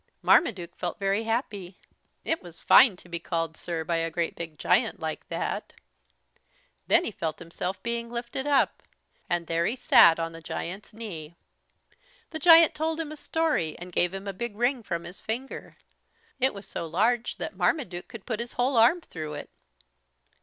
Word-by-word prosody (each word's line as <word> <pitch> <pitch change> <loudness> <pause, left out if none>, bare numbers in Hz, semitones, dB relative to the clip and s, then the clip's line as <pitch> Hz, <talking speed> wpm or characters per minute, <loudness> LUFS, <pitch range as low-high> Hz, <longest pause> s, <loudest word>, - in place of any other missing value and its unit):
Marmaduke 180 - +3
felt 175 - -4
very 200 +2 0
happy. 205 -6 -3 0.5
It 325 - 0
was 175 -2 -11
fine 235 -8 +7
to 180 - -16
be 170 -1 -4
called 165 -1 -2
"Sir" 165 -1 -4
by 170 +1 0
a 165 0 0
great 170 0 -2
big 165 -2 -7
giant 225 +3 +2
like 160 -1 -5
that. - - -3 1.1
Then - - +5
he - - -2
felt 160 -2 -3
himself 180 +3 -5
being 235 0 -2
lifted 240 +3 -4
up, 285 -2 +2 0.5
and 175 -1 0
there 165 +1 0
he 235 - -1
sat 170 -9 +6
on 165 0 -2
the 165 0 -10
giant's 185 +5 -6
knee. 175 -8 -8 1.0
The 315 - -4
giant 330 0 +8
told 320 +1 -2
him 315 -2 -4
a - - -6
story 305 - -1
and 180 +1 -9
gave 175 +1 +2
him 195 +1 -7
a 200 - -3
big 225 +2 -5
ring 245 +3 +1
from 170 -5 -4
his 180 +3 -9
finger. 245 +5 -5 0.6
It 265 -3 +2
was 200 0 -9
so 165 - -5
large 225 +8 +1
that - - -5
Marmaduke 185 - -1
could 230 -4 -11
put 225 -3 -3
his 235 0 -5
whole 250 +1 +1
arm 245 +10 +5
through 155 - -7
it. 145 - -8
195 Hz, 180 wpm, -27 LUFS, 170-245 Hz, 1.1 s, giant